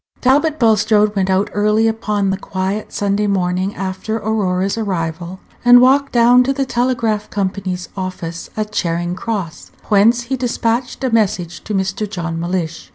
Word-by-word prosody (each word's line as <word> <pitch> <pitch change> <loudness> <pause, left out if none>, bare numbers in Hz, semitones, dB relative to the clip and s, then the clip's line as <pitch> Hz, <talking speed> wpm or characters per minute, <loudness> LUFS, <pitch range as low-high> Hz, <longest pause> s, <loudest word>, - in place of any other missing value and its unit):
Talbot 290 +4 +2
Bulstrode 215 -3 +3
went 190 -1 0
out 190 +2 +1
early 210 +2 +2
upon 210 -3 -1
the 190 - -1
quiet 195 +2 -4
Sunday 205 +1 0
morning 185 0 -1
after 190 +3 -4
Aurora's 195 -3 -1
arrival, 175 -4 -3 0.2
and 245 0 +8
walked 270 +2 +4
down 245 +1 +5
to 270 +2 0
the 275 0 -1
Telegraph 240 -4 -1
Company's 190 -2 -3
Office 185 -3 -5
at 215 0 -2
Charing 175 -2 -1
Cross, 190 -4 -5 0.2
whence 220 +4 +4
he 245 +3 -3
despatched 245 0 -2
a 260 - 0
message 190 -6 0
to 210 - -3
Mr. 190 +2 -2
John 170 -4 -4
Mellish. 170 -1 -3
205 Hz, 155 wpm, -18 LUFS, 185-230 Hz, 0.2 s, and